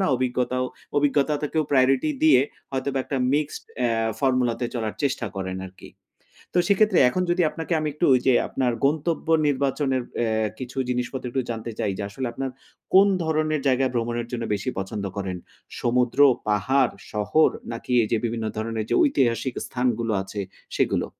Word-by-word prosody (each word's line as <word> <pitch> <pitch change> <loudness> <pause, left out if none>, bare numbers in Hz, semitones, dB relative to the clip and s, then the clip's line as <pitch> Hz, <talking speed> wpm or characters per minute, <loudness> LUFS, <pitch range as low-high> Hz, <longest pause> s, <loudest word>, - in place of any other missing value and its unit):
না, 190 - +2
অভিজ্ঞতাও, 125 0 0 0.3
অভিজ্ঞতা 145 +1 +2
তো 150 - +1
কেউ 160 -1 +2
priority 135 +2 +3
দিয়ে 150 -5 +7 0.3
হয়তোবা 135 0 -1
একটা 140 - -3 0.2
mixed 150 0 -2
অ্যা 120 -2 +1 0.3
formula 130 -3 +2
তে 120 - 0
চলার 110 -3 -2
চেষ্টা 140 -4 0
করেন 95 -1 -3
আরকি। 95 +1 -14 0.6
তো - - +3
সেক্ষেত্রে 200 -1 +4
এখন 185 +8 0
যদি 175 +1 +2
আপনাকে 165 +2 -5
আমি 155 - -1
একটু 165 - -1
ওইযে 130 +1 +3 0.2
আপনার 125 -2 0
গন্তব্য 155 +4 0 0.2
নির্বাচনের 135 -1 0 0.2
অ্যা 110 -2 +1
কিছু 130 0 -7
জিনিসপত্র 125 +1 -2
একটু 130 +2 -1
জানতে 115 0 -4
চাই 100 - 0
যে - - -3
আসলে 125 +6 -4
আপনার 135 +2 -3 0.4
কোন 195 +1 +8 0.2
ধরনের 155 -1 0
জায়গায় 130 -1 +2
ভ্রমণের 120 0 -1
জন্য 120 -1 -2
বেশি 100 +5 -2
পছন্দ 100 +2 -4
করেন? 95 -2 -3 0.4
সমুদ্র, 125 +2 +1 0.3
পাহাড়, 120 +5 +2 0.2
শহর 105 +9 +3 0.2
নাকি 115 +2 -5
এই 110 - -1
যে - - +4
বিভিন্ন 115 -1 -2
ধরণের 110 0 -2
যে - - +2
ঐতিহাসিক 130 - +1
স্থানগুলো 120 -3 -1
আছে 100 +2 -6 0.4
সেগুলো? - - +1
130 Hz, 165 wpm, -24 LUFS, 115-140 Hz, 0.6 s, কোন